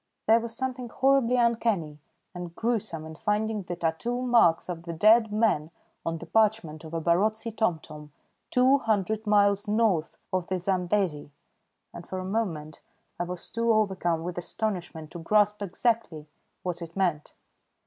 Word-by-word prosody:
There 225 Hz, +1 st, +5 dB
was 230 Hz, 0 st, -5 dB
something 255 Hz, -2 st, -3 dB
horribly 265 Hz, -1 st, +3 dB
uncanny 225 Hz, -10 st, +1 dB, 0.3 s
and 175 Hz, -1 st, -7 dB
gruesome 220 Hz, -9 st, -2 dB
in 160 Hz, -, -8 dB
finding 210 Hz, +4 st, -1 dB
the 175 Hz, -1 st, -5 dB
tattoo 170 Hz, +10 st, -2 dB
marks 230 Hz, -10 st, +4 dB
of 175 Hz, -2 st, -5 dB
the 170 Hz, 0 st, -6 dB
dead 215 Hz, +5 st, +5 dB
man 210 Hz, -8 st, +1 dB, 0.3 s
on 165 Hz, 0 st, -2 dB
the 170 Hz, -, -9 dB
parchment 205 Hz, -6 st, +1 dB
of 160 Hz, +1 st, -7 dB
a -, -, 0 dB
Barotse 210 Hz, +7 st, +1 dB
tomtom 155 Hz, -8 st, -2 dB, 0.4 s
two 260 Hz, +3 st, +4 dB
hundred 220 Hz, -2 st, -1 dB
miles 205 Hz, 0 st, +3 dB
north 210 Hz, -7 st, +1 dB, 0.2 s
of 185 Hz, -2 st, 0 dB
the 185 Hz, -1 st, -1 dB
Zambesi, 180 Hz, -4 st, 0 dB, 0.6 s
and 170 Hz, -, -10 dB
for 190 Hz, -, -5 dB
a 185 Hz, -, -4 dB
moment 180 Hz, -7 st, -3 dB, 0.4 s
I 175 Hz, -, 0 dB
was 180 Hz, 0 st, -6 dB
too 230 Hz, 0 st, +1 dB
overcome 190 Hz, -6 st, +1 dB
with 175 Hz, 0 st, -4 dB
astonishment 175 Hz, -5 st, -3 dB
to 175 Hz, -, -7 dB
grasp 210 Hz, +4 st, +2 dB
exactly 200 Hz, -5 st, -1 dB, 0.4 s
what 180 Hz, -1 st, -3 dB
it 170 Hz, 0 st, -8 dB
meant. 175 Hz, -6 st, -1 dB
195 Hz, 155 wpm, -27 LUFS, 170-225 Hz, 0.6 s, There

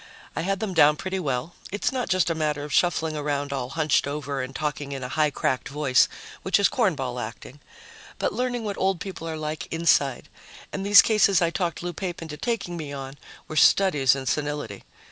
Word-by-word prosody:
I -, -, -1 dB
had 195 Hz, +3 st, -1 dB
them 210 Hz, -4 st, -2 dB
down 150 Hz, -3 st, +6 dB
pretty 190 Hz, +4 st, -3 dB
well 140 Hz, 0 st, -2 dB, 0.2 s
it's 205 Hz, -, -1 dB
not 255 Hz, -4 st, -2 dB
just 185 Hz, -2 st, +2 dB
a -, -, +2 dB
matter 150 Hz, -2 st, -1 dB
of 145 Hz, -1 st, -6 dB
shuffling 160 Hz, -3 st, +2 dB
around 145 Hz, -1 st, -2 dB
all 130 Hz, -2 st, -3 dB
hunched 155 Hz, -1 st, +1 dB
over 140 Hz, -1 st, -3 dB
and 130 Hz, +1 st, -6 dB
talking 145 Hz, -2 st, -3 dB
in 135 Hz, -1 st, -5 dB
a 125 Hz, -, -4 dB
high 155 Hz, -1 st, +3 dB
cracked 130 Hz, -2 st, -1 dB
voice, 140 Hz, -3 st, +3 dB, 0.3 s
which 190 Hz, +1 st, +2 dB
is 200 Hz, -, +5 dB
cornball 145 Hz, -, 0 dB
acting, 120 Hz, +5 st, -8 dB, 0.6 s
but -, -, -1 dB
learning 245 Hz, -1 st, -2 dB
what 205 Hz, -2 st, -4 dB
old 190 Hz, -2 st, +1 dB
people 180 Hz, -4 st, -6 dB
are 160 Hz, -, -4 dB
like 155 Hz, 0 st, -4 dB
inside 160 Hz, -5 st, +2 dB, 0.5 s
and 195 Hz, -, -3 dB
these 200 Hz, +1 st, +8 dB
cases 200 Hz, -4 st, +4 dB
I 170 Hz, -1 st, +1 dB
talked 170 Hz, -3 st, -2 dB
Lou 175 Hz, 0 st, -3 dB
Pape 175 Hz, 0 st, -4 dB
into 160 Hz, -2 st, -7 dB
taking 195 Hz, -3 st, -3 dB
me 150 Hz, -3 st, -6 dB
on 135 Hz, -1 st, -6 dB, 0.3 s
were 155 Hz, -, -7 dB
studies 150 Hz, -8 st, +5 dB
in 135 Hz, -1 st, -5 dB
senility. 145 Hz, +2 st, -2 dB
155 Hz, 200 wpm, -25 LUFS, 140-185 Hz, 0.6 s, these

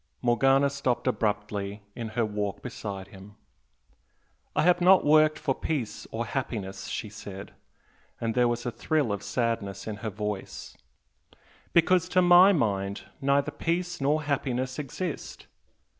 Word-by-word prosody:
Morgana 135 Hz, +3 st, +4 dB
stopped 135 Hz, -3 st, -1 dB
abruptly 105 Hz, -4 st, -2 dB
in 115 Hz, -2 st, -4 dB
her 115 Hz, -, +3 dB
walk 105 Hz, -2 st, -3 dB
beside 95 Hz, -2 st, -6 dB
him. 100 Hz, +1 st, -13 dB, 1.2 s
"I -, -, +3 dB
have 180 Hz, +1 st, +4 dB
not 185 Hz, +2 st, +6 dB
worked 155 Hz, +1 st, +5 dB
for 135 Hz, -, 0 dB
peace 135 Hz, -5 st, -3 dB
or 115 Hz, +1 st, -3 dB
happiness," 100 Hz, -7 st, -4 dB
she 110 Hz, -, -4 dB
said 100 Hz, -2 st, -9 dB, 0.7 s
and 115 Hz, -1 st, -1 dB
there 125 Hz, 0 st, +3 dB
was 120 Hz, 0 st, -2 dB
a 120 Hz, -, -1 dB
thrill 140 Hz, +2 st, 0 dB
of 100 Hz, -, -4 dB
sadness 105 Hz, -2 st, -2 dB
in 110 Hz, -2 st, -5 dB
her 110 Hz, +2 st, -4 dB
voice 105 Hz, -1 st, -5 dB, 1.0 s
"because 180 Hz, +1 st, +3 dB
to 185 Hz, -, +4 dB
my 175 Hz, +2 st, +8 dB
mind 100 Hz, -, 0 dB, 0.2 s
neither 140 Hz, +1 st, +2 dB
peace 175 Hz, 0 st, -2 dB
nor 150 Hz, +3 st, +2 dB
happiness 130 Hz, -2 st, -2 dB
exist. 150 Hz, +4 st, -5 dB
120 Hz, 140 wpm, -27 LUFS, 105-150 Hz, 1.2 s, my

